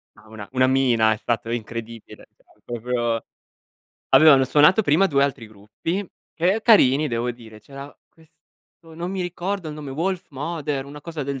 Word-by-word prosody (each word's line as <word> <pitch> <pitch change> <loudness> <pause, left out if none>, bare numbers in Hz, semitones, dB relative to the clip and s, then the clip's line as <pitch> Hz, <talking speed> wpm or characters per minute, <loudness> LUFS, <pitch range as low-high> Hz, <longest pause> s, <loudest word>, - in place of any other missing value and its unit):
No, - - -20
una 105 -2 -10
una 130 0 +3
mina, 120 -4 +3
è - - -6
stato 115 0 -3
incredibile. 115 -1 -7 0.2
No, - - -27
è - - -34
proprio 120 -1 -2 0.9
Allora, 155 -2 +8
hanno 135 -1 +3
suonato 150 +10 +4
prima 175 +2 +3
2 140 -5 +2
altri 130 -5 -4
gruppi, 110 - -5 0.3
che 185 +6 +1
carini 150 - +4
devo 120 +1 -2
dire, 110 -3 -13
c'era 140 +5 -11 0.2
questo 160 0 -23
non 175 +2 -5
mi 195 - -4
ricordo 180 0 -4
il 150 - -7
nome, 145 -3 -8
Wolfmother, 155 -3 -3
una 145 +1 -11
cosa 160 -1 -6
del 140 -1 -4
140 Hz, 170 wpm, -22 LUFS, 120-165 Hz, 0.9 s, Allora